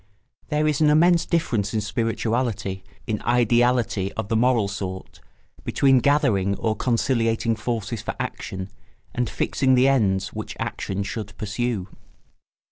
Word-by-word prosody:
There 150 -1 +1
is 150 0 0
an 150 - +5
immense 170 +3 +4
difference 120 - 0
in 110 - +1
spirituality, 115 -3 -2 0.2
in 110 -3 -2
ideality 120 -4 +2
of 100 - -4
the 115 - +1
moral 115 -2 +3
sort, 95 -2 -6 0.4
between 135 -2 +3
gathering 120 -9 +2
or 110 +1 -1
conciliating 115 -1 +1
forces 110 -1 -3
for - - -4
action 95 0 -5 0.4
and 125 -1 -1
fixing 130 -1 +1
the 125 +1 +5
ends 100 -8 +2
which - - -6
action 100 +1 -3
should 105 0 -6
pursue. 105 -1 -2
115 Hz, 130 wpm, -23 LUFS, 100-130 Hz, 0.4 s, an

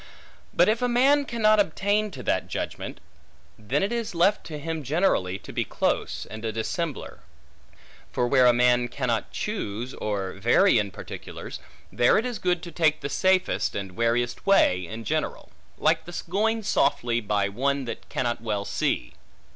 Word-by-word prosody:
But - - +4
if 220 +2 +2
a 245 - +1
man 275 +4 +4
cannot 215 -4 +3
obtain 205 +3 +1
to 135 -10 -9
that - - 0
judgment, - - -5 0.6
then 125 - 0
it 200 - 0
is 230 -5 -3
left 190 +5 +3
to 155 - -6
him 160 +2 -4
generally, 140 - +1
to - - -11
be - - 0
close, - - -1
and 110 +1 -9
a 110 - -1
dissembler. 135 - -4 0.9
For 125 - 0
where 130 -1 +5
a - - +8
man 120 0 +3
cannot 120 -2 -2
choose, 125 - -4
or 100 -3 -3
vary 120 - +4
in 100 -1 -1
particulars, - - -8 0.3
there 120 - +4
it 220 - +1
is 245 -3 -3
good 180 -2 0
to 170 - -7
take 155 -1 +2
the 140 - -3
safest, 185 +4 +1
and 95 -2 -5
wariest 120 +1 0
way, 90 - +4
in 110 +3 -7
general; - - -3 0.3
like - - +2
the 175 +1 -6
going 220 +5 0
softly, 140 - +1
by 100 -2 0
one 135 +6 -1
that 120 - -7
cannot 120 -3 -2
well 105 -3 -2
see. - - -1
140 Hz, 170 wpm, -26 LUFS, -, 0.9 s, a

